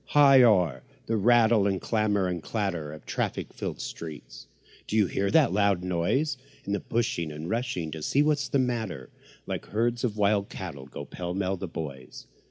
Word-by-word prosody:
high 140 -3 +7
o'er 90 - +4 0.2
the 115 - 0
rattle 110 -1 +4
and 95 -2 0
clamour 105 -3 +1
and 90 -2 -3
clatter 85 -7 -2
Of 75 - -11
traffic - - -3
filled - - -5
streets, - - -8 0.4
do - - -3
you 105 - +5
hear 100 +2 -1
that 95 - +4
loud 100 -3 +2
noise? 90 - 0 0.3
And 100 0 -3
pushing 110 -9 0
and 75 +2 -6
rushing 90 -7 -2
to 80 - -6
see 140 - +2
what's 150 -1 +1
the - - +1
matter, 120 - -2 0.3
Like - - -5
herds 115 +3 0
of 110 -4 -1
wild 100 -1 +2
cattle, 70 -1 -7
go 70 - -7
pell 90 +2 -5
mell 95 0 0
the 95 +1 -5
boys. 70 -6 -7
100 Hz, 180 wpm, -27 LUFS, 85-115 Hz, 0.4 s, high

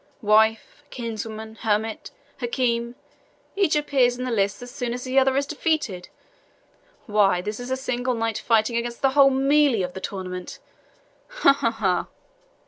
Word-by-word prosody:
Wife 220 +5 +2
kinswoman 220 -2 -6
hermit 220 0 -2 0.3
Hakim 240 -1 -1 0.6
each 390 -6 +2
appears 265 -5 +2
in 250 - -4
the 250 - -3
lists 200 0 0
as 245 - -9
soon 245 -2 -3
as 250 - -6
the 260 +1 +2
other 265 0 +2
is 280 - +1
defeated! 295 - -2 1.0
Why, 205 -4 +3
this 210 +5 -5
is 245 +1 -7
a 260 - -1
single 250 -1 -2
knight 225 -1 -2
fighting 225 0 +2
against 235 +1 -4
the 270 - +4
whole 275 0 +6
MELEE 270 -4 +3
of 180 0 -4
the 190 - -7
tournament 185 -2 -6 0.7
ha! - - +4
ha! 260 -4 0
ha!" 215 -5 -1
235 Hz, 155 wpm, -24 LUFS, 215-265 Hz, 1.0 s, whole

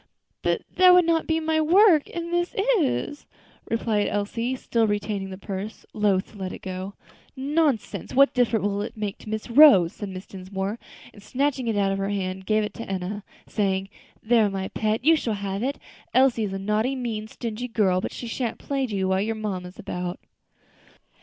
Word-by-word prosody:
"But - - 0
that 365 -1 +8
would 360 -1 +6
not 330 -1 +1
be 320 0 +1
my 315 0 +1
work, 340 -1 +5
and 340 0 -5
this 345 0 0 0.2
is," 290 0 -2 0.4
replied 220 -2 0
Elsie, 230 +5 -2
still 230 -3 0
retaining 205 -1 -2
the 190 - -7
purse, 200 +2 -6
loath 205 -3 +1
to 210 - -14
let 185 -1 -4
it - - -9
go. 190 +1 -5 0.4
"Nonsense! 280 -4 -1
what 275 +1 +6
difference 240 -4 +2
will 200 0 0
that 225 +3 -5
make 210 -2 -4
to - - -10
Miss 215 0 -3
Rose?" 235 - +7
said 205 - -6
Mrs. 185 0 -8
Dinsmore; 190 +3 -4 0.3
and 205 - -15
snatching 265 +3 -1
it 220 -2 0
out 195 -1 +2
of 195 - -2
her 195 0 -1
hand, 190 -2 -2
she - - -13
gave 215 +1 +2
it 210 - -4
to 230 - -8
Enna, 195 +2 -3 0.2
saying, 195 -2 -1 0.3
"There, 225 -2 +4
my 190 -1 -4
pet, 220 +3 -1
you 325 +1 +7
shall 230 -8 -1
have 200 0 -3
it. 275 +4 -1 0.4
Elsie 255 -4 +4
is 195 - -4
a - - -2
naughty, 215 +6 0
mean, 225 -4 -4
stingy 230 +1 -5
girl, 195 -6 +2
but - - -4
she - - -7
shan't 235 0 -3
plague 270 -3 -2
you 195 -3 -1
while 190 0 +2
your 225 +2 -1
mamma's 190 -4 -5
about." 180 0 -5
215 Hz, 195 wpm, -25 LUFS, 195-255 Hz, 0.4 s, that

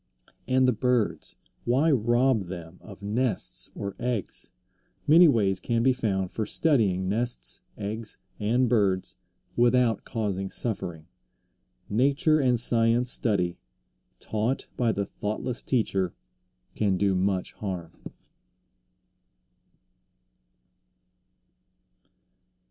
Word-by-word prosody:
And 130 0 +3
the 125 - +3
birds, 110 -8 0 0.3
why 135 +7 +2
rob 120 -2 +2
them 85 -1 -9
of 100 -1 -13
nests 100 - +1
or 100 -1 -5
eggs? 120 -5 -2 0.6
Many 165 +3 +7
ways 100 -8 +2
can 115 -1 0
be 130 +1 +4
found 95 -7 -2
for 110 - -2
studying 105 - +1
nests, 105 - -1 0.2
eggs, 110 +2 -2 0.2
and 120 +5 +2
birds, 100 -6 +1 0.4
without 120 -2 +3
causing 100 -4 -3
suffering. 85 -10 -3 0.8
Nature 140 - +2
and 125 -4 +2
science 120 +1 +3
study, 90 -6 0 0.6
taught 110 - -2
by 120 -2 +1
the 100 -2 -2
thoughtless 110 +5 -4
teacher, 95 -8 0 0.6
can 100 -3 0
do 100 0 +2
much 95 0 -1
harm. 90 -5 -5
110 Hz, 100 wpm, -26 LUFS, 95-125 Hz, 0.8 s, Many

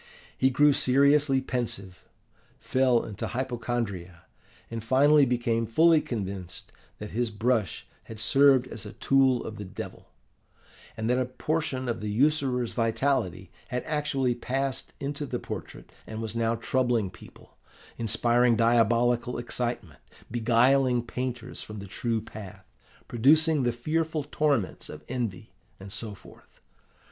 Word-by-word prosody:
He 130 - +3
grew 145 +3 +4
seriously 140 +1 +3
pensive, 110 -8 -4 0.6
fell 130 -2 +2
into 105 -3 -5
hypochondria, 120 -8 -4 0.5
and 115 -1 -4
finally 140 +4 +5
became 120 -2 0
fully 160 +7 +5
convinced 95 - -6 0.3
that 105 - -8
his 120 +1 -1
brush 110 -2 -1 0.2
had 110 -2 -9
served 135 +2 +5
as 115 - -7
a 105 +1 -8
tool 135 -2 +3
of 110 - -7
the 105 - -6
Devil; 95 - -8 0.9
and 110 - -2
that 125 +1 +2
a 130 - +1
portion 130 0 -2
of 115 -2 -2
the 105 - -3
usurer's 130 0 +1
vitality 115 -6 0 0.2
had 125 -1 -3
actually 145 -4 0
passed 135 +2 -3
into 145 +1 -4
the - - -2
portrait, - - -8 0.2
and 110 - -6
was 110 0 -5
now 115 0 +1
troubling 120 -4 0
people, 90 - -16 0.4
inspiring 120 +2 +3
diabolical 120 +1 +2
excitement, 120 - -3 0.3
beguiling 120 +2 +3
painters 125 0 -5
from 105 - -8
the 100 - -7
true 115 +3 -2
path, 105 -3 -10 0.4
producing 155 +6 +4
the 120 -1 +1
fearful 155 +5 -1
torments 145 -7 -1
of - - -9
envy, 110 -6 -4 0.3
and 95 0 -9
so 110 -1 -5
forth. - - -18
120 Hz, 135 wpm, -27 LUFS, 110-135 Hz, 0.9 s, finally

